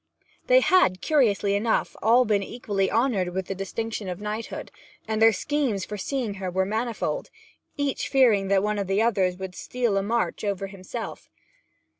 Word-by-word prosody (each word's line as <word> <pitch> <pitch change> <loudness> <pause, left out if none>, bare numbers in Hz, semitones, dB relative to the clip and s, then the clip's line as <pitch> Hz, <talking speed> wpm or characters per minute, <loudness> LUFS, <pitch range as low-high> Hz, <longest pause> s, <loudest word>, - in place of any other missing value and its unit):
They - - +6
had, 185 - +4
curiously 210 - +2
enough, 220 +3 0
all 240 +3 +5
been 210 -3 +2
equally 200 -3 -2
honoured 205 -8 +1
with 190 -1 -1
the 195 - -3
distinction 210 +2 -4
of 180 0 -5
knighthood, 210 +2 -5 0.4
and 220 0 -1
their 225 0 +8
schemes 240 -3 -1
for 210 - -6
seeing 235 +1 -2
her 185 - -2
were 190 +1 0
manifold, 230 - -2 0.5
each 285 -2 -1
fearing 230 -8 +4
that 195 0 +3
one 210 0 0
of 200 - -2
the 195 +3 +2
others 190 -6 +1
would 190 -1 -6
steal 240 0 -1
a - - +2
march 230 +3 -1
over 200 -1 -1
himself. 190 -2 -7
210 Hz, 170 wpm, -25 LUFS, 195-235 Hz, 0.5 s, their